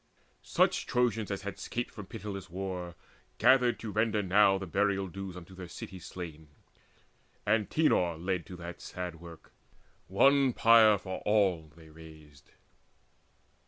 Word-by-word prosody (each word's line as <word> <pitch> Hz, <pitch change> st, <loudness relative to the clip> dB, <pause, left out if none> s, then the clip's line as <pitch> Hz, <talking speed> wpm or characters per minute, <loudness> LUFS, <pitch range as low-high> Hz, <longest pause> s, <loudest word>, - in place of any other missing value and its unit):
Such -, -, +1 dB
Trojans 115 Hz, -4 st, 0 dB
as 100 Hz, -1 st, -4 dB
had 100 Hz, 0 st, -6 dB
scaped 120 Hz, 0 st, -4 dB
from 105 Hz, -4 st, -10 dB
pitiless 100 Hz, -2 st, -7 dB
war 90 Hz, -1 st, -5 dB, 0.4 s
Gathered 125 Hz, 0 st, +4 dB
to 110 Hz, -, -5 dB
render 110 Hz, 0 st, +1 dB
now 95 Hz, +1 st, +4 dB
the 95 Hz, -, -6 dB
burial 100 Hz, +1 st, 0 dB
dues 95 Hz, 0 st, -7 dB
Unto 90 Hz, +1 st, -12 dB
their 95 Hz, -1 st, -9 dB
city's 90 Hz, +1 st, -9 dB
slain. 80 Hz, -4 st, -8 dB, 1.0 s
Antenor 105 Hz, -, +2 dB
led 90 Hz, 0 st, -3 dB
To 90 Hz, -, -9 dB
that 85 Hz, 0 st, -9 dB
sad 90 Hz, -2 st, -6 dB
work: 85 Hz, -2 st, -13 dB, 0.5 s
one 135 Hz, +7 st, +4 dB
pyre 110 Hz, -2 st, +6 dB
for 95 Hz, -1 st, -6 dB
all 95 Hz, -6 st, +1 dB
they 80 Hz, -1 st, -16 dB
raised. 75 Hz, -3 st, -15 dB
95 Hz, 135 wpm, -30 LUFS, 85-105 Hz, 1.0 s, pyre